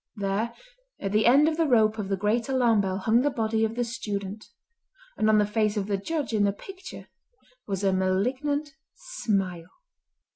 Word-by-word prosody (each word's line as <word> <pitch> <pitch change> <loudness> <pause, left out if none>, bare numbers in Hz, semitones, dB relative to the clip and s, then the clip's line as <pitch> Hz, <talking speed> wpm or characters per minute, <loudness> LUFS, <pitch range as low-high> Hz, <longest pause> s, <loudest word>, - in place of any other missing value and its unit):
There 205 +3 -2 0.4
at 195 - -3
the 215 +2 +3
end 280 +5 +6
of 320 0 0
the 330 -2 +2
rope 220 -4 +3
of 200 -2 -3
the 195 - 0
great 220 +5 0
alarm 240 -5 +3
bell 190 -1 -2
hung 225 +4 +2
the 290 - +2
body 225 -3 0
of 220 0 -1
the 245 - 0
student, 210 -4 -5 0.7
and 215 - +1
on 215 - +5
the 210 - +4
face 210 0 0
of 200 - -1
the 205 0 -1
Judge 285 +6 -3
in 210 -2 +2
the 200 - +3
picture 380 - -10 0.6
was 195 -1 -3
a 195 -1 +3
malignant 255 +11 0 0.2
smile. 195 - -3
215 Hz, 185 wpm, -26 LUFS, 200-245 Hz, 0.7 s, end